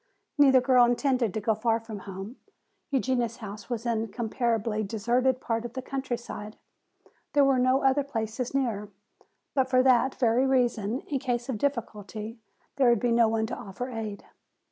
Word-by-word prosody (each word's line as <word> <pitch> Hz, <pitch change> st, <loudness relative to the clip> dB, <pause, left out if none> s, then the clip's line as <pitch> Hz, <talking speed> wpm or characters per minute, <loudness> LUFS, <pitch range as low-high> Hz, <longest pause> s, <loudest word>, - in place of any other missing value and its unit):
Neither 265 Hz, -3 st, +7 dB
girl 255 Hz, -1 st, +5 dB
intended 245 Hz, -2 st, +1 dB
to -, -, 0 dB
go 220 Hz, +1 st, +1 dB
far 225 Hz, +1 st, +1 dB
from 225 Hz, -2 st, -8 dB
home. 195 Hz, +5 st, -8 dB, 0.5 s
Eugenia's 255 Hz, -4 st, 0 dB
house 210 Hz, 0 st, -9 dB
was 235 Hz, -1 st, -3 dB
in 225 Hz, -2 st, 0 dB
a -, -, -9 dB
comparatively 225 Hz, -1 st, -1 dB
deserted 240 Hz, +5 st, +1 dB
part 230 Hz, -2 st, -2 dB
of 240 Hz, -1 st, -7 dB
the 260 Hz, -, -4 dB
countryside. 240 Hz, -5 st, -5 dB, 0.8 s
There 285 Hz, -1 st, +5 dB
were 270 Hz, -2 st, +3 dB
no 255 Hz, +2 st, +3 dB
other 270 Hz, +1 st, +4 dB
places 240 Hz, -1 st, -3 dB
near. 220 Hz, -7 st, -1 dB, 0.6 s
But 265 Hz, -2 st, +1 dB
for 255 Hz, -1 st, +4 dB
that 260 Hz, 0 st, +4 dB
very 245 Hz, +2 st, +2 dB
reason 245 Hz, -3 st, +1 dB
in 275 Hz, -, -3 dB
case 245 Hz, -1 st, -2 dB
of 230 Hz, -5 st, -2 dB
difficulty 220 Hz, -4 st, -3 dB, 0.4 s
there 260 Hz, -3 st, +5 dB
would 235 Hz, -2 st, +4 dB
be 240 Hz, +1 st, +1 dB
no 230 Hz, -1 st, +5 dB
one 220 Hz, 0 st, 0 dB
to 235 Hz, -, -4 dB
offer 245 Hz, +6 st, -6 dB
aid. 215 Hz, -3 st, -5 dB
240 Hz, 170 wpm, -27 LUFS, 220-260 Hz, 0.8 s, Neither